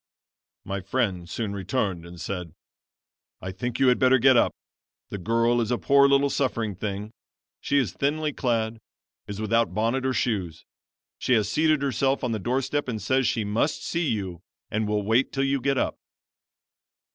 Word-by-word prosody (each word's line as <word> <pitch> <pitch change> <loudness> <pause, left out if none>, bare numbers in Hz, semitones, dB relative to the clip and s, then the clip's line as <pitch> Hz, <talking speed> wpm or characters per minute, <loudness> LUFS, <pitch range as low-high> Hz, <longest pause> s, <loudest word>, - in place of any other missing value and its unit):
"My 100 0 -3
friend 95 -4 -1
soon 105 -1 -3
returned 95 -3 -2
and 85 0 -11
said: 90 -1 -5 0.8
"'I 95 - -5
think 120 +6 -4
you 135 -1 +5
had 125 - +3
better 130 0 +5
get 130 +1 +5
up. 120 - +4 0.6
The 100 - -5
girl 115 +4 +2
is 115 - -2
a 125 - +1
poor 140 +2 +5
little 140 0 +3
suffering 115 -6 -1
thing. 100 +2 -5 0.5
She 140 - 0
is 135 -4 +1
thinly 150 +1 -1
clad, 115 -3 -1 0.5
is 100 0 -6
without 110 -4 +1
bonnet 115 +5 0
or 130 0 0
shoes. 95 -11 -2 0.5
She 130 - +1
has 110 -3 +2
seated 155 -2 +2
herself 135 +1 0
on 125 - 0
the 110 - -1
doorstep 130 +6 -1
and 115 -3 -3
says 130 +6 +1
she 110 - 0
must 105 +9 -1
see 170 -1 -1
you 95 - -3 0.3
and 110 0 0
will 105 0 0
wait 115 +6 +2
till 135 - 0
you 135 -1 0
get 140 0 +1
up.' - - -1
115 Hz, 175 wpm, -25 LUFS, 100-135 Hz, 0.8 s, you